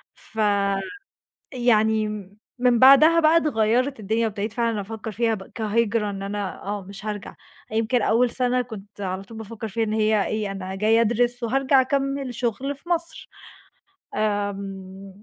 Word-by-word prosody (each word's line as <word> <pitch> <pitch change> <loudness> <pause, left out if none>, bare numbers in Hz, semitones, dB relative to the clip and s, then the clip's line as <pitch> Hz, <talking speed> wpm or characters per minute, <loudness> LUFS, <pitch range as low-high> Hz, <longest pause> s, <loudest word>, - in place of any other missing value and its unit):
فيعني 200 - -1 1.1
م 205 -1 -7 0.2
من 245 -1 +3
بعدها 290 +6 +8
بقى 320 +1 +5
اتغيّرِت 255 -2 +1
الدنيا 220 +3 0
وأبتديت 210 0 -4
فعلًا 230 -3 0
أفكّر 220 +2 -6
فيها 225 +2 +1
بقى 190 -2 -11
كهجرة 220 -1 0
إن 195 -1 -5
أنا 200 -1 -4
آه، 205 0 -3
مش 200 +3 -11
هارجع. 210 -1 -5 0.4
يمكن 225 +3 +1
أول 240 +3 +3
سَنة 250 +1 +1
كنت 205 -4 -10
على 190 0 -3
طول 225 +2 -12
بافكّر 220 0 -6
فيها 225 +3 -1
إن 215 -1 -2
هي 215 -2 +2
إيه، 215 -2 -2
أنا 190 -1 -5
جايه 220 +3 +3
أدرس 240 +2 +1
وهارجع 270 +3 +3
أكمِّل 275 -1 -1
شُغل 250 +4 -2
في 315 +6 -16
مصر، 335 -1 -2 0.9
آمم 195 -2 -4
220 Hz, 150 wpm, -24 LUFS, 200-245 Hz, 1.1 s, بعدها